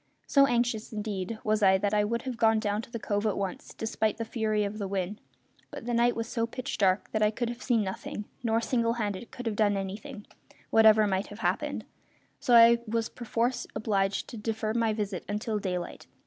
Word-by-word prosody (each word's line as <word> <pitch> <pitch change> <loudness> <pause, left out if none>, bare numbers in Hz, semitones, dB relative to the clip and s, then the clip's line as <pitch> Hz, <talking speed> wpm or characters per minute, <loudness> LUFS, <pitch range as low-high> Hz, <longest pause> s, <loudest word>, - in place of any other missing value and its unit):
So 275 -1 +5
anxious, 235 -3 0
indeed, 210 -1 -4
was 215 0 +1
I 190 -1 +6
that 205 +2 -1
I 210 0 +3
would 235 +2 -2
have 255 -2 -4
gone 225 -1 +3
down 210 -1 -1
to - - -12
the 235 - -4
cove 205 -1 -1
at 210 - 0
once, 195 -2 -4
despite 220 -1 -1
the 230 - -3
fury 215 -2 0
of 205 +1 -4
the 200 - -2
wind, 195 +1 -3 0.5
but - - -8
the 240 - -2
night 235 +1 +3
was 230 -1 -3
so 230 -1 -1
pitch 255 +3 -5
dark 190 -1 +2
that 215 - -1
I 210 - +5
could 235 +2 -2
have 240 +1 -6
seen 235 -4 +2
nothing; 195 +2 -5 0.2
nor, 230 -1 +1
single 230 -1 +1
handed, 210 -1 -3
could 250 - -8
I - - +1
have - - -5
done 205 -1 +2
anything, 205 +4 -6 0.5
whatever 220 -1 +6
might 190 -1 0
have 205 +2 -10
happened; - - -1 0.5
so 245 - +3
I 235 0 +8
was 225 +1 -1
perforce 240 +1 -2
obliged 195 -2 0
to 235 - -7
defer 220 0 -2
my 230 -1 +2
visit 205 -4 -3
until 210 +1 -1
daylight. 180 -3 -4
220 Hz, 215 wpm, -28 LUFS, 205-230 Hz, 0.5 s, I